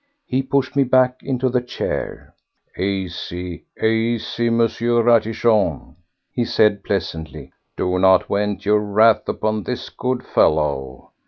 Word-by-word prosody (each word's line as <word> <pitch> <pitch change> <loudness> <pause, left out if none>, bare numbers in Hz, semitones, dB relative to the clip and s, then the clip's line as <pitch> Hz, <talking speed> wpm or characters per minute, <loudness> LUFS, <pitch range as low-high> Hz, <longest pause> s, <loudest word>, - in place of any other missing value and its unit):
He 130 +1 0
pushed 135 +1 -1
me 140 - +4
back 130 0 +2
into 130 -1 -1
the 125 0 +1
chair. 125 - -5 0.4
"Easy, 90 -2 -4
easy, 115 +1 0
M. 115 0 +1
Ratichon," 115 -2 +1 0.4
he 120 - -1
said 105 -3 +2
pleasantly; 80 -6 -4 0.2
"do 90 0 0
not 95 0 +4
vent 100 -1 -2
your 105 +1 +3
wrath 105 +2 +3
upon 110 0 -1
this 125 +4 -5
good 125 0 -3
fellow. 70 -4 0
110 Hz, 120 wpm, -20 LUFS, 95-120 Hz, 0.4 s, me